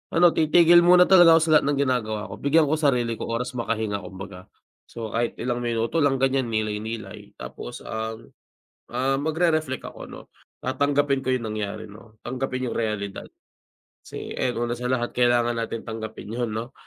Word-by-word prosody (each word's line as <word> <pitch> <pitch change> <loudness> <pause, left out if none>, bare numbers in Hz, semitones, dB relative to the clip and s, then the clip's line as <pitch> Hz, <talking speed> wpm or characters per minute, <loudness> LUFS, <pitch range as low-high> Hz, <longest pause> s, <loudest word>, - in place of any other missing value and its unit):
ano 175 0 +6
titigil 170 +2 +5
muna 180 +1 +7
talaga 175 -3 +7
ako 165 - +4
sa 160 - 0
lahat - - -5
ng 145 -1 0
ginagawa 110 -5 -2
ko. - - -8
Bigyan 155 +3 +3
ko 155 - +2
sarili 120 -6 +1
ko - - -4
oras 115 +2 -2
makahinga 110 -3 -2
kumbaga. 95 0 -10 0.4
So, 115 -2 -7
kahit 115 +2 -1
ilang 120 0 -2
minuto 120 +6 -1
lang 145 -2 +3
ganyan 135 -1 +1
nilay-nilay 110 0 -4
tapos - - -9
ang 110 0 -6 0.6
ah, 135 +2 +1
magre-reflect 155 -2 0
ako, - - -10
'no? - - -12 0.3
Tatanggapin 140 +1 +1
ko 130 -1 0
yung 115 -3 -3
nangyari, 105 0 -5
'no? 110 +1 -16
Tanggapin 130 -1 -3
yung - - -4
realidad. 105 -3 -3 0.8
Kasi, - - -8
ayun 120 -1 -1
una 120 - -2
sa 125 +1 -4
lahat 120 -2 -1
kailangan 120 -1 +2
natin 115 -1 -4
tanggapin 110 -1 -7
yun, 120 -1 -2
'no? 115 +3 -5
120 Hz, 170 wpm, -24 LUFS, 110-140 Hz, 0.8 s, muna